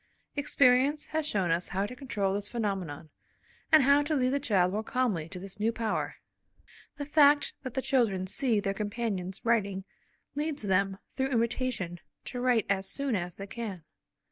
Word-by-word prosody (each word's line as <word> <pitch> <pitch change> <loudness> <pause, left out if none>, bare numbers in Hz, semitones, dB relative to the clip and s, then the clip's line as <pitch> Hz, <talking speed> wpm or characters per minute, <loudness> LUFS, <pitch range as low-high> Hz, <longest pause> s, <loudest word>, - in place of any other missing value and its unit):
Experience 280 0 +3
has 315 -1 -2
shown 190 - +1
us 170 +2 0
how 195 +2 -1
to 250 - -7
control 205 -7 -1
this 200 0 -1
phenomenon, 190 -10 -3 0.6
and 310 -3 +7
how 280 +2 +5
to 300 +1 -1
lead 255 -2 +2
the 280 - +1
child 195 -10 +2
more 215 - 0
calmly 220 -9 -1
to 185 - -6
this 195 +2 -9
new 220 +2 +2
power. 225 -2 -2 0.8
The 285 - -4
fact 295 -1 +5
that 260 -3 -7
the 265 - -1
children 215 -8 +2
see 225 +3 +1
their 195 -1 -1
companions 205 -3 -3
writing, 200 -5 +1 0.5
leads 295 -2 -2
them, 195 0 +1 0.2
through 265 0 0
imitation, 230 -7 -1 0.3
to 245 - -4
write 245 -3 +3
as 195 -1 0
soon 275 -1 -1
as 180 -1 -3
they 195 - -6
can. 200 -5 -6
225 Hz, 170 wpm, -29 LUFS, 195-265 Hz, 0.8 s, and